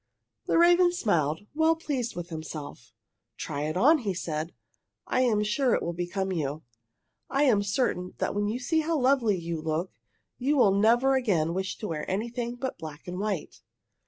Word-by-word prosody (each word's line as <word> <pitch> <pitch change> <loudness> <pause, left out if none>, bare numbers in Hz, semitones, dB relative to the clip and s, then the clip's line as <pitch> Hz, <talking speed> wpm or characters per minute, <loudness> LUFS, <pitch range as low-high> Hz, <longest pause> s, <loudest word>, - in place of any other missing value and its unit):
The - - +2
raven 350 +1 +6
smiled, 160 - 0
well 320 +2 +3
pleased 270 -8 -3
with 175 0 -6
himself. 155 -7 -7 0.5
"Try 145 -1 -3
it 155 - -3
on," 300 - +5
he 200 -7 -2
said. 160 -1 -3 0.5
"I 255 - +1
am 220 -5 +2
sure 235 +4 +2
it - - -2
will 170 - -2
become 185 +3 -2
you. 155 -3 -3 0.7
I 275 +1 +2
am 230 -8 +4
certain 200 -3 -1
that - - -1
when 205 0 0
you 220 +3 -1
see 320 +6 0
how 320 +1 0
lovely 250 -6 +3
you 170 -2 -4
look, 160 +3 -2 0.5
you 280 +4 +1
will 200 -7 +5
never 235 +6 +4
again 185 -11 +1
wish 190 +1 -3
to 215 - -5
wear 155 -4 -4
anything 235 +4 -2
but 260 -4 -5
black 155 -1 -9
and 180 +1 -5
white." 200 -5 -3
205 Hz, 180 wpm, -27 LUFS, 170-255 Hz, 0.7 s, raven